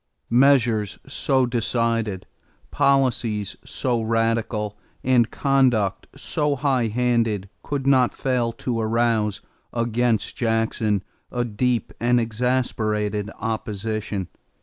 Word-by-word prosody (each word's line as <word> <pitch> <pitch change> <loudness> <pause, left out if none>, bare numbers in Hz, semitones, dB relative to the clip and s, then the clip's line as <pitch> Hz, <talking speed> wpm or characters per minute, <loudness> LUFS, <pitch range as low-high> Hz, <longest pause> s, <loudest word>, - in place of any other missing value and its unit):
= - - -48 0.2
Measures 115 -7 +2
so 135 -1 +1
decided, 115 -4 -1 0.5
policies 120 -7 +1
so 130 -2 -1
radical, 115 -2 0 0.3
and 125 -3 +3
conduct 125 -8 +1
so 150 -1 -1
high 130 -4 +1
handed 115 -3 +1
could 140 -2 -3
not 130 -3 +4
fail 125 -3 0
to 115 0 -3
arouse 110 -2 +1 0.3
against 115 -2 0
Jackson 115 -4 0 0.3
a 120 -1 -1
deep 120 +2 -1
and 120 +1 +3
exasperated 110 -3 -1
opposition. 110 -3 -3
115 Hz, 100 wpm, -23 LUFS, 110-125 Hz, 0.5 s, not